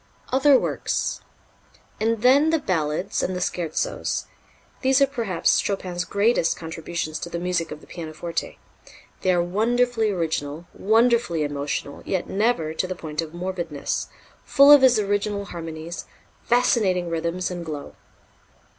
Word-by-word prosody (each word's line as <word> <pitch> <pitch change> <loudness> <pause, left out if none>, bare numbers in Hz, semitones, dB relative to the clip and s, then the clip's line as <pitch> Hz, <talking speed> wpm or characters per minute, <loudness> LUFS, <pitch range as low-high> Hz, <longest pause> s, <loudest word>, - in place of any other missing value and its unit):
Other 270 +1 +6
Works. - - -2 0.8
And 225 0 0
then 280 +5 +6
the 325 - +3
Ballades 175 - -1
and 185 - -1
the - - -2
Scherzos. 170 -3 -2 0.6
These 265 0 +3
are 275 - +6
perhaps 230 -10 +1
Chopin's 180 -3 -3
greatest 205 -3 +2
contributions 160 -1 -4
to 170 - -6
the 170 - -4
music 175 -1 -1
of 150 0 -8
the - - -15
pianoforte. 165 0 -5 0.6
They 185 - +2
are 175 -1 +2
wonderfully 225 +4 +1
original, 160 -4 -2
wonderfully 225 -6 +2
emotional, 145 0 -3
yet 185 -2 -2
never 195 -7 0
to 185 - -1
the 185 - -4
point 155 -2 -4
of 165 0 -8
morbidness, 175 -5 -3 0.4
full 280 0 +6
of 290 -2 +9
his 255 -3 +6
original 205 0 -1
harmonies, 165 -2 -7 0.4
fascinating 210 -7 +2
rhythms 170 +3 -2
and 175 -1 -5
glow. 150 -3 -6
180 Hz, 135 wpm, -24 LUFS, 165-225 Hz, 0.8 s, of